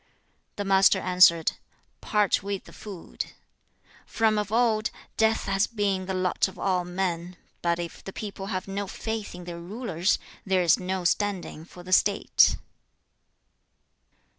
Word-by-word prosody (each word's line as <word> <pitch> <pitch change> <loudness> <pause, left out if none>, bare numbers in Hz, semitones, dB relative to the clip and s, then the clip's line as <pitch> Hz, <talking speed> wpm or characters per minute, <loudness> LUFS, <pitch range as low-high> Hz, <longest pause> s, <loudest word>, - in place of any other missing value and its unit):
The 205 - -3
Master 195 0 +5
answered, 180 -3 +5 0.5
'Part 210 -2 +2
with 200 0 -4
the - - -15
food. 195 -5 -7 0.7
From 220 -1 +2
of 210 -1 -3
old, 225 -2 +2 0.3
death 220 0 +2
has 195 +1 +1
been 200 -4 -1
the 190 - -2
lot 185 0 +1
of 190 - -12
all 185 -2 0
men; 180 -1 -3 0.2
but 170 0 +1
if 170 -1 -6
the 195 - -7
people 200 -1 -6
have 185 -1 -3
no 200 +1 -3
faith 220 0 -5
in 180 - -9
their 175 -1 -7
rulers, 190 -1 -1 0.3
there 190 -2 +2
is 170 - +4
no 185 0 -2
standing 185 -4 -1
for 175 0 -13
the 185 +1 -3
state.' 200 +1 +4
190 Hz, 145 wpm, -26 LUFS, 180-205 Hz, 0.7 s, Master